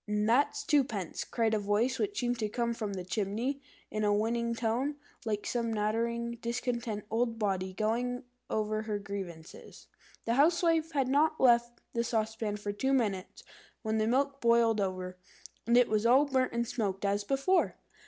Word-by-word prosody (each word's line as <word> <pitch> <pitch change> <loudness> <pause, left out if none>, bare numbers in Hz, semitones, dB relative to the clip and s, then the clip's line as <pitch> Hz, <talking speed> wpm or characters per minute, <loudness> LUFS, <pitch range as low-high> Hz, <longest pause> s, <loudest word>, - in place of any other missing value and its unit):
"And 210 0 0
that's 250 +6 +2
twopence," 235 - 0
cried 225 -2 0
a 215 - +2
voice 210 +5 +1
which 410 -1 -1
seemed 245 -1 -1
to 215 -2 -1
come 235 +1 -1
from 215 -3 -4
the 185 -2 -4
chimney, 220 +8 -2 0.3
in 215 0 -1
a 205 - +3
whining 230 +3 0
tone, 235 +6 0 0.3
like 210 -2 -2
some 235 -2 -1
nattering, 235 +2 -1
discontented 235 -3 -2
old 230 0 0
body 190 -3 -1
going 240 +5 -1 0.3
over 215 0 -1
her 215 -1 -2
grievances. 195 -5 -8 0.4
The 230 - +1
Housewife 325 +3 +3
had 275 -3 +1
not 305 +4 +2
left 240 -1 +3
the 235 - +1
saucepan 220 -2 -1
for 205 0 -3
two 265 +7 0
minutes, 205 -8 -1 0.4
when 220 0 0
the 215 - +1
milk 275 +3 +1
boiled 235 -2 +4
over, 185 -1 -3 0.5
and 235 +1 +5
it 245 -1 +6
was 215 0 +1
all 265 +5 +6
burnt 260 -3 +1
and 235 0 0
smoked 205 -5 -2
as 200 +1 +1
before. 275 - +1
230 Hz, 170 wpm, -31 LUFS, 210-245 Hz, 0.5 s, it